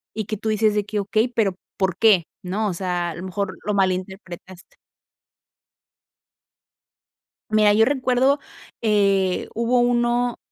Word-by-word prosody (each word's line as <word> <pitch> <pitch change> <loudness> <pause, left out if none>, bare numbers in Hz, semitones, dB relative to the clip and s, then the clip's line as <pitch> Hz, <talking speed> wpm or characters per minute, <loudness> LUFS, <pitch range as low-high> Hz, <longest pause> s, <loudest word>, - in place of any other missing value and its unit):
y 215 - -3
que 215 +2 -4
tú 220 +1 -3
dices 215 0 +2
de 210 - +1
que: 210 0 -3
"Okey, 215 +4 +1
pero, 215 -6 0 0.2
¿por 190 -2 -1
qué?", 200 -6 +5 0.2
¿no?, 205 +4 -2
o - - -3
sea, 175 -1 -2
a - - -8
lo 175 - -8
mejor 190 +1 -4
lo 210 - -1
malinterpretaste. 185 -1 -4 2.7
Mira, 215 -1 +4
yo 225 +1 +5
recuerdo, 260 +1 +2 0.4
eh, 200 -4 +1
hubo 235 +2 +1
uno, 240 0 +1
210 Hz, 135 wpm, -22 LUFS, 190-230 Hz, 2.7 s, qué